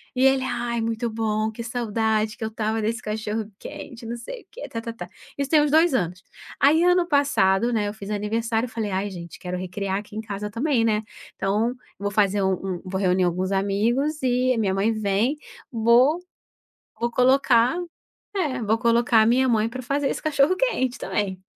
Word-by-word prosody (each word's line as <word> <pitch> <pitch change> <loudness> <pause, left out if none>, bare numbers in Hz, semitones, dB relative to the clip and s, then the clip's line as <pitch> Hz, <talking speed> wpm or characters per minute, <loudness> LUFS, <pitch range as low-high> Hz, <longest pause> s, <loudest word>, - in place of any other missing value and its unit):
E 255 - +2
ele 270 -1 +4
"ai 240 -2 -2
é - - 0
muito 230 +1 -1
bom, 220 -1 -1
que 235 +2 -7
saudade 220 -2 -1
que - - -6
eu 220 - -1
estava 220 0 -2
desse 230 +3 -1
cachorro-quente", 220 +4 -6
não 235 - -4
sei 240 - -8
o - - -38
quê - - -8
ta 230 - -4
ta 230 0 -6
ta, 175 -6 -8 0.3
isso 280 - -1
tem 310 - +5
uns 295 - 0
2 320 -1 +4
anos. 180 -4 -2 0.4
Aí 310 +4 +5
ano 360 0 +4
passado, 240 - +2
né, 210 -2 +1
eu 205 - -4
fiz 205 -1 -7
aniversário, 225 +3 -1
falei 220 -2 -3
ai 190 +2 -1
gente 170 -3 -9
quero 180 -1 -4
recriar 190 +2 -3
aqui 210 +1 -8
em 220 - -3
casa 210 -1 -5
também, 245 0 +1
né, 215 -1 +2 0.3
então, 210 +5 0 0.2
vou 205 0 -3
fazer 205 -1 +2
um 190 0 +2
um 185 -2 -3
vou 190 +1 -3
reunir 185 0 +2
alguns 185 +2 0
amigos 230 +10 0
e 255 0 +2
a - - -3
minha 200 -3 +1
mãe 210 +4 +1
vem, 215 +5 +1 0.4
vou 240 +7 +4 0.8
vou 235 0 0
colocar, 250 0 +4 0.6
é 295 -9 -1
vou 220 +1 +2
colocar 235 -1 +4
a - - +3
minha 255 +3 +3
mãe 225 -1 +2
pra 255 - -6
fazer 275 +3 0
esse - - -4
cachorro-quente 305 - +1
também. 190 -3 -2
225 Hz, 195 wpm, -24 LUFS, 205-255 Hz, 0.8 s, tem